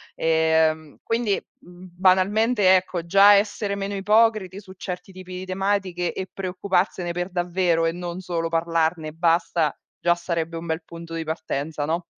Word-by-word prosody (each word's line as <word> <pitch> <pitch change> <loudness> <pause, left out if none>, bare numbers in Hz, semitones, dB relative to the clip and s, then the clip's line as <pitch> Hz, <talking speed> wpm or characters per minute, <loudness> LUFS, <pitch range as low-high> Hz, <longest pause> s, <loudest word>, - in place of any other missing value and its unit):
Ehm, 160 -1 +1
quindi 230 -3 0 0.2
mhmm, 180 +1 -14
banalmente, 190 +2 +4
ecco, 180 -2 -1
già 200 +4 +7
essere 205 0 +1
meno 200 0 -4
ipocriti 210 -1 +2
su 190 -2 -13
certi 185 0 -7
tipi 185 -1 -10
di 185 - -6
tematiche 185 -2 -1
e 190 - -5
preoccuparsene 185 -1 -1
per 175 +1 -3
davvero 175 -2 +1
e 165 - +2
non 175 +1 -6
solo 170 -2 -2
parlarne 165 -1 0
e - - -9
basta, 165 -1 +1 0.2
già 175 0 +3
sarebbe 170 -1 -3
un 165 - -7
bel 160 0 -3
punto 165 0 -10
di 165 0 -3
partenza, 155 -1 -3
no? 165 +3 -2
180 Hz, 160 wpm, -23 LUFS, 165-190 Hz, 0.2 s, già